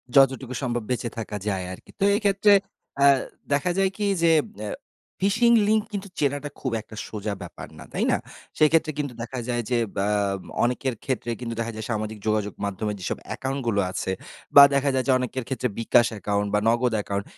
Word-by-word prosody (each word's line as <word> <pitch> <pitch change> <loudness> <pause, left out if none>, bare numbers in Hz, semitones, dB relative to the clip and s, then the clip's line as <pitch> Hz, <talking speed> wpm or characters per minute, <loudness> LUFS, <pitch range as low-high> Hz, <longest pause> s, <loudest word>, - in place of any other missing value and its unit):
যতটুকু 135 -1 +4
সম্ভব 120 -3 -1
বেঁচে 120 -1 -1
থাকা 110 -2 -4
যায় 95 -3 -1
আরকি। - - -13
তো 195 - +1
এক্ষেত্রে 205 0 +4 0.4
অ্যা 140 0 +5 0.4
দেখা 145 +6 +2
যায় 195 -1 +3
কি 210 - -1 0.2
যে 165 -1 +5 0.3
অ্যা 105 -1 -4 0.5
phishing 235 +4 +4
লিংক 215 0 +4
কিন্তু 200 0 -4
চেনাটা 145 0 0
খুব 130 - -2
একটা 110 - -13
সোজা 105 -1 -4
ব্যাপার - - -8
না, - - -9
তাই - - 0
না? - - +3 0.4
সেইক্ষেত্রে 155 +1 +4
কিন্তু 145 -4 -2
দেখা 120 +2 -5
যায় 120 -1 -1 0.3
বা 100 - +1 0.6
অনেকের 125 +2 0
ক্ষেত্রেই 120 -3 -2
কিন্তু 115 -1 -3
দেখা 115 0 -2
যায় 110 -1 -5
সামাজিক 110 0 -3
যোগাযোগ 105 -2 0
মাধ্যমে 105 +2 -2
যেসব 90 - -3
অ্যাকাউন্টগুলো 130 -6 -1
আছে 95 0 -2 0.4
বা 140 - +12
দেখা 140 0 +2
যায় 130 -1 +1
যে - - +4
অনেকের 130 0 -3
ক্ষেত্রে 130 -1 -1
bKash 115 0 +4
অ্যাকাউন্ট 105 0 -1
বা 105 - +4
Nagad 120 +1 +2
অ্যাকাউন্ট 100 -1 -2
125 Hz, 180 wpm, -25 LUFS, 110-140 Hz, 0.6 s, বা